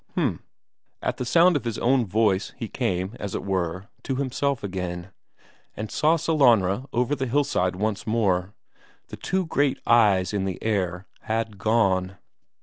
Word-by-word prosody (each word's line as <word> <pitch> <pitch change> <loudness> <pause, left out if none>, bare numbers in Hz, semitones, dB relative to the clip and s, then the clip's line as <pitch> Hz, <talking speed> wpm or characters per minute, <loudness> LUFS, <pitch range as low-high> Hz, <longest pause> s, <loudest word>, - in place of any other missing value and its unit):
H'm. - - -1 0.6
At - - -1
the 125 - -3
sound 170 +6 +5
of 145 - 0
his 115 -3 -3
own 125 -2 +2
voice 100 -1 +1
he - - -4
came, 95 +4 -2
as 100 -2 -4
it - - -4
were, 90 -1 -2
to 135 - -3
himself 140 -1 -1
again, 90 -2 -4 0.7
and 105 0 -5
saw 155 +2 +3
Sellanraa 130 - +3
over 125 +4 0
on - - -1
the 130 - -1
hillside 120 -9 +1
once 105 +2 -2
more. 100 -4 0 0.5
The - - -8
two 185 -2 -1 0.4
eyes 105 -5 +4
in 100 -2 -1
the 95 -2 -3
air 95 -4 -1 0.2
had 110 -2 -2
gone. 95 -4 +1
105 Hz, 155 wpm, -25 LUFS, 95-125 Hz, 0.7 s, sound